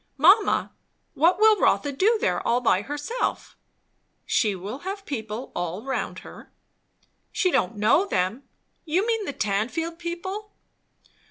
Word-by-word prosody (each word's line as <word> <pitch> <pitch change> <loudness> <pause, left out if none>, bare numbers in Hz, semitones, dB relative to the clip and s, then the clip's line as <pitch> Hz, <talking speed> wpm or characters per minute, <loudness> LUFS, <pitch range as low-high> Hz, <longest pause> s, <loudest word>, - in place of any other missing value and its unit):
"Mamma, 380 +9 +4 0.4
what 345 +6 +3
will 435 -1 +6
Rotha 285 - +2
do 405 - +2
there, - - 0
all 240 +1 +1
by 210 -6 +2
herself?" 290 - -3 0.7
"She 210 -4 +1
will 200 +8 -6
have 395 +3 -6
people 220 -2 -5
all 175 +4 -3
round 265 0 -3
her." - - -12 0.8
"She 370 - +1
don't 185 - +1
know 220 - +3
them. 190 - -1 0.4
You 350 +6 0
mean 450 -2 0
the 285 - -3
Tanfield 255 - -2
people?" 375 +5 -5
295 Hz, 135 wpm, -25 LUFS, -, 0.8 s, will